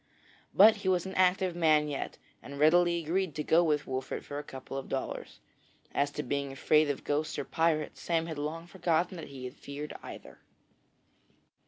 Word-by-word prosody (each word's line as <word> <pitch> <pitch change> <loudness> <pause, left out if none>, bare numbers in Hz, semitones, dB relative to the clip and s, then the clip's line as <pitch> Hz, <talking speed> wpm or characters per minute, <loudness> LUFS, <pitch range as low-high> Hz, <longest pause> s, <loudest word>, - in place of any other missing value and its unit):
But, 215 +2 +7
he 200 -2 -1
was 180 -1 +2
an 190 - -5
active 185 -1 +2
man 155 -3 +4
yet, 145 -2 -4 0.2
and 140 0 -9
readily 170 +3 +4
agreed 170 0 -1
to 150 - -2
go 165 +3 +4
with 150 -3 +1
Wolfert 130 0 -4
for 145 - -5
a - - -6
couple 135 -1 -9
of 135 - -5
dollars. 135 - -4 0.5
As 140 0 +1
to 150 - -3
being 140 +1 -2
afraid 150 +2 +3
of 140 - -3
ghosts 150 +2 -1
or - - -3
pirates, 160 -2 0
Sam 165 -1 0
had 160 -3 -5
long 160 +3 -4
forgotten 175 0 0
that 165 - -7
he 135 -2 -8
had 125 - -6
feared 145 +2 -7
either. - - -10
155 Hz, 185 wpm, -30 LUFS, 145-175 Hz, 0.5 s, But